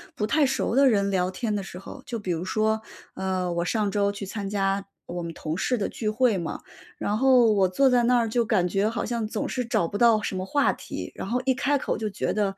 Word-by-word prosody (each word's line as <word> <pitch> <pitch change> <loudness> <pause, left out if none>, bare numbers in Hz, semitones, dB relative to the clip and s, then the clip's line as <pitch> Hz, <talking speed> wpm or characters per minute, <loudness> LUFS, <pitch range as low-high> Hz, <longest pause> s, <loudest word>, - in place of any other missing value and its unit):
不 210 - -1
太 290 +6 +3
熟 265 -3 0
的 275 0 +6
人 200 -3 +2
聊 185 -1 +1
天 215 +2 -2
的 200 - -2
时 180 -1 -9
候， 195 - -10
就 235 -2 -4
比 190 -4 -3
如 170 0 -2
说， 220 +3 0 0.3
呃， 185 -2 -1
我 170 0 0
上 210 +1 0
周 200 0 +1
去 200 0 -6
参 200 0 -5
加 195 -1 0 0.2
我 175 0 -5
们 165 0 -5
同 155 0 -4
事 250 +6 0
的 205 - -1
聚 215 - -3
会 220 -1 +2
嘛， 170 -2 -4 0.4
然 210 - -1
后 250 -3 +5
我 195 -2 +3
坐 270 +8 +3
在 245 -1 +3
那 245 +1 +4
儿 230 -1 +2
就 235 +2 +2
感 205 -5 +2
觉 195 +4 +1
好 230 - -3
像 235 -2 -2
总 215 - -3
是 250 - -2
找 200 -7 +1
不 205 - -4
到 230 -1 +5
什 195 - -3
么 185 - -3
话 285 +8 +2
题， - - -7
然 - - -6
后 245 +4 0
一 265 - +3
开 285 +2 +1
口 - - -2
就 215 -1 -2
觉 200 - -2
得 200 -2 -1
210 Hz, 275 characters per minute, -25 LUFS, 190-235 Hz, 0.4 s, 的